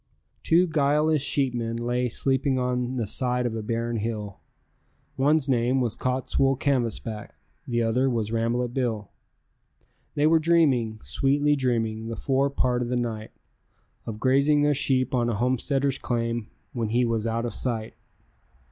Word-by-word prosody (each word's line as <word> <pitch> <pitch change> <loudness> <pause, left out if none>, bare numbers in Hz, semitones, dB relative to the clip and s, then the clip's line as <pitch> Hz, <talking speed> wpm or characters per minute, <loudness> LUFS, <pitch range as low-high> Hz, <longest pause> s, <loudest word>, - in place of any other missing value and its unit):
Two 175 +3 +4
guileless 150 -1 +2
sheepmen 120 -5 0
lay 120 +1 -1
sleeping 135 +2 +1
on 125 0 -1
the 120 -3 -1
side 125 +3 0
of 115 -2 -2
a 110 - -3
barren 115 +2 -2
hill, 105 -2 -4 0.8
One's 145 +1 +2
name 125 0 +2
was 120 -4 -1
Cottswool 130 +1 0
Canvasback, 115 -5 -2 0.3
the 120 -1 0
other 125 +4 +1
was 110 -3 -2
Rambolet 120 +1 -1
Bill. 115 -6 -2 1.0
They 145 - +2
were 160 +1 +5
dreaming, 140 -10 +2
sweetly 140 - +1
dreaming, 115 -4 -1
the 115 - -4
fore 135 +3 +1
part 125 -3 0
of 120 - -2
the 125 - 0
night 115 -3 -3 0.8
Of 110 -2 -5
grazing 140 +4 +3
their 145 0 +3
sheep 130 -1 +1
on 120 -2 +1
a 115 - -1
homesteader's 130 +4 0
claim 115 -2 -2 0.3
when 115 -3 -2
he 120 +2 +2
was 115 -1 -1
out 115 +1 -1
of 120 - -4
sight. 115 -3 -3
125 Hz, 150 wpm, -25 LUFS, 115-135 Hz, 1.0 s, were